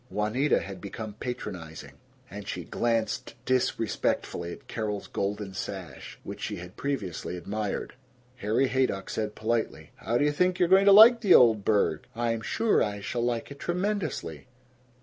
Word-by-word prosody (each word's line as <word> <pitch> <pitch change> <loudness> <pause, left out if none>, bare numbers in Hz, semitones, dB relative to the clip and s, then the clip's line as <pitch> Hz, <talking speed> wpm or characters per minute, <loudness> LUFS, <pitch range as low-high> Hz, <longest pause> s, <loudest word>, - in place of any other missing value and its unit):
Juanita 110 +8 +1
had 95 -2 -8
become 105 +1 -6
patronizing, 90 - -6 0.4
and 100 -2 -9
she - - -4
glanced 115 -2 -1
disrespectfully 115 -8 -1
at - - -11
Carol's 105 -3 -3
golden 100 0 -3
sash, - - -7
which - - -8
she - - -3
had 90 +1 -10
previously 100 - -3
admired. 100 +3 -4 0.4
Harry 115 +5 +1
Haydock 125 -7 0
said 105 -1 -3
politely, 115 +1 -2
"How 115 +2 -1
do 145 - +2
you 150 - +3
think 180 +4 +1
you're 175 -2 +2
going 190 +1 +6
to 200 - +8
like 225 +4 +9
the 200 -5 +6
old 110 -4 +6
burg?" 100 -8 +1
"I'm 115 -1 -1
sure 225 - +1
I 105 -1 -1
shall 120 +4 -3
like 120 +2 -2
it 140 - -10
tremendously." 175 - -3
115 Hz, 155 wpm, -27 LUFS, 100-135 Hz, 0.4 s, like